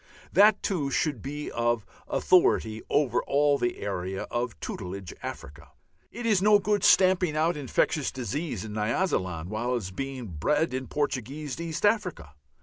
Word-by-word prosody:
That, 210 Hz, +2 st, +5 dB
too, 165 Hz, -9 st, -1 dB
should 140 Hz, -4 st, 0 dB
be 145 Hz, +2 st, -5 dB
of 120 Hz, -1 st, 0 dB, 0.2 s
authority 115 Hz, -11 st, +3 dB
over 125 Hz, -4 st, +2 dB
all 145 Hz, 0 st, +2 dB
the 120 Hz, -, -1 dB
area 95 Hz, -1 st, -3 dB
of 120 Hz, -1 st, -2 dB
"tutelage" 95 Hz, -1 st, -6 dB
Africa. 75 Hz, +3 st, -8 dB, 0.4 s
It 240 Hz, 0 st, -7 dB
is 210 Hz, -5 st, +3 dB
no 210 Hz, +1 st, +6 dB
good 205 Hz, 0 st, 0 dB
stamping 185 Hz, -4 st, +4 dB
out 165 Hz, +2 st, +2 dB
infectious 145 Hz, +1 st, 0 dB
disease 130 Hz, -, -4 dB
in 105 Hz, -, -7 dB
Nyasaland 105 Hz, -, -1 dB
while 120 Hz, +4 st, -1 dB
it -, -, +2 dB
is 95 Hz, -5 st, -5 dB
being 135 Hz, +3 st, -5 dB
bred 130 Hz, -, 0 dB
in 130 Hz, 0 st, -3 dB
Portuguese 145 Hz, +1 st, -3 dB
East 165 Hz, +3 st, -2 dB
Africa. 190 Hz, -, 0 dB
135 Hz, 150 wpm, -27 LUFS, 110-165 Hz, 0.4 s, no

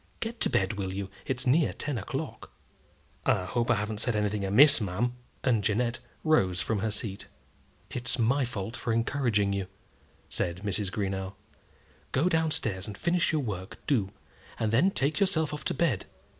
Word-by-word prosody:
Get 230 Hz, +1 st, -4 dB
to -, -, +3 dB
bed, 105 Hz, -4 st, 0 dB
will 95 Hz, -1 st, -2 dB
you? 95 Hz, 0 st, -4 dB, 0.2 s
It's 130 Hz, 0 st, -1 dB
near 145 Hz, +5 st, +3 dB
ten 145 Hz, -6 st, -3 dB
o'clock." 145 Hz, +7 st, -5 dB, 0.7 s
"I 90 Hz, -, +2 dB
hope 120 Hz, +5 st, -1 dB
I 120 Hz, -, +5 dB
haven't 105 Hz, 0 st, -2 dB
said 120 Hz, 0 st, +1 dB
anything 105 Hz, -1 st, 0 dB
amiss, 125 Hz, +8 st, +7 dB
ma'am;" 105 Hz, +5 st, -1 dB, 0.3 s
and 115 Hz, -5 st, +2 dB
Jeannette 115 Hz, +3 st, +1 dB, 0.2 s
rose 95 Hz, -, +3 dB
from 110 Hz, +1 st, 0 dB
her 110 Hz, -, 0 dB
seat. 100 Hz, -1 st, -4 dB, 0.6 s
"It's 120 Hz, -1 st, +2 dB
my 130 Hz, +4 st, +2 dB
fault 110 Hz, -1 st, -4 dB
for 115 Hz, -3 st, -2 dB
encouraging 115 Hz, -4 st, +1 dB
you," 100 Hz, -2 st, -2 dB, 0.6 s
said 90 Hz, +2 st, -3 dB
Mrs. 100 Hz, -1 st, -1 dB
Greenow. 95 Hz, -1 st, -3 dB, 0.8 s
"Go 155 Hz, +7 st, +3 dB
down 160 Hz, -2 st, +2 dB
stairs 95 Hz, -10 st, -1 dB
and 105 Hz, -2 st, -7 dB
finish 170 Hz, 0 st, +2 dB
your 155 Hz, -2 st, +1 dB
work, 95 Hz, -5 st, -5 dB
do; 110 Hz, -9 st, +1 dB, 0.5 s
and 110 Hz, -1 st, 0 dB
then 150 Hz, +12 st, +5 dB
take 150 Hz, -3 st, 0 dB
yourself 160 Hz, -6 st, +2 dB
off 150 Hz, -, -5 dB
to -, -, 0 dB
bed. 135 Hz, -, +1 dB
115 Hz, 170 wpm, -29 LUFS, 100-140 Hz, 0.8 s, amiss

